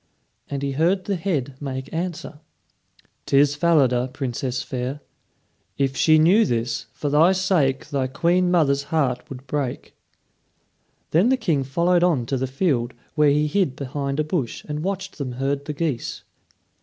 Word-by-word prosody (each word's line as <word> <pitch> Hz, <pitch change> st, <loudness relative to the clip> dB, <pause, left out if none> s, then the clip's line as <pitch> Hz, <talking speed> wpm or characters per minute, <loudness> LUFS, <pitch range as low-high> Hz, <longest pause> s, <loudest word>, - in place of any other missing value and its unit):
and 140 Hz, -1 st, -3 dB
he 140 Hz, -, -1 dB
heard 175 Hz, +7 st, +1 dB
the 200 Hz, -, -1 dB
head 155 Hz, -7 st, -2 dB
make 130 Hz, -2 st, -5 dB
answer: 165 Hz, -3 st, -4 dB, 0.9 s
"'Tis 140 Hz, +1 st, +4 dB
Falada, 140 Hz, -6 st, +3 dB
Princess 130 Hz, -1 st, -3 dB
fair. 130 Hz, +3 st, -4 dB, 0.8 s
If 135 Hz, -1 st, 0 dB
she 155 Hz, +3 st, +5 dB
knew 180 Hz, +8 st, +5 dB
this, 115 Hz, -, -2 dB
for 140 Hz, +4 st, -5 dB
thy 155 Hz, +6 st, +5 dB
sake 175 Hz, -8 st, +1 dB
Thy 135 Hz, -3 st, 0 dB
queen 175 Hz, +6 st, +1 dB
mother's 140 Hz, -5 st, +2 dB
heart 140 Hz, -6 st, -1 dB
would 130 Hz, 0 st, -9 dB
break." 135 Hz, -2 st, -3 dB, 1.2 s
Then 180 Hz, +9 st, +4 dB
the 265 Hz, -, +3 dB
King 155 Hz, -, 0 dB
followed 170 Hz, +6 st, +2 dB
on 155 Hz, -9 st, +2 dB
to 135 Hz, +3 st, -1 dB
the 130 Hz, +1 st, -1 dB
field, 130 Hz, -4 st, 0 dB, 0.2 s
where 150 Hz, -2 st, +4 dB
he 150 Hz, +1 st, +2 dB
hid 150 Hz, -3 st, 0 dB
behind 140 Hz, +1 st, -3 dB
a -, -, +3 dB
bush 150 Hz, -6 st, -3 dB
and 150 Hz, 0 st, -3 dB
watched 190 Hz, -1 st, -4 dB
them 130 Hz, -3 st, -3 dB
herd 140 Hz, +2 st, -2 dB
the 150 Hz, -, -4 dB
geese. 145 Hz, -5 st, -3 dB
145 Hz, 155 wpm, -23 LUFS, 130-170 Hz, 1.2 s, she